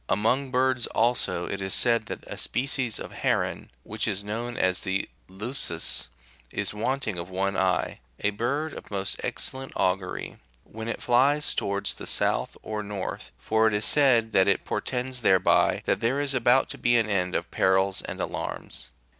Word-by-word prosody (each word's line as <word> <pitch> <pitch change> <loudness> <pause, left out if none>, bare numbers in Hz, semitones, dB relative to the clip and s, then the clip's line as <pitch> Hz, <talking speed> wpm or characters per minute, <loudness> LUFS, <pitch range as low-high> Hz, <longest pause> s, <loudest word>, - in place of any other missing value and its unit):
Among 125 +7 +1
birds 130 -1 +1
also, 105 -7 +1
it 100 - -4
is 95 0 0
said 115 -2 +4
that - - -6
a - - -7
species 130 -2 0
of - - -6
heron, - - -1
which 110 +1 -3
is 100 -2 -1
known 115 +4 -4
as 95 -1 +2
the 95 +1 -1 0.2
"leucus,"9^ 95 -3 -1 0.4
is - - -2
wanting 110 -3 -2
of 85 +2 -6
one 95 +1 -1
eye: 95 -1 0 0.2
a 105 - +1
bird 140 +9 -2
of - - -10
most 95 -1 -3
excellent 135 0 -3
augury, 95 0 -1 0.3
when 110 +1 -8
it 115 - -4
flies 140 +5 +3
towards 100 0 0
the - - -9
south - - 0
or 110 -1 -3
north, 100 -2 -5
for 110 - +2
it 105 - +1
is 105 +1 +1
said 125 -6 +4
that 95 -1 +4
it 100 - +2
portends 125 0 -3
thereby 95 -4 +3
that - - +1
there 120 +4 +1
is 145 -1 +1
about 130 0 +4
to - - -7
be 120 0 +3
an 115 -2 +2
end 90 -3 0
of - - -2
perils 95 0 +2
and - - -7
alarms. - - -4
110 Hz, 175 wpm, -26 LUFS, 95-125 Hz, 0.4 s, said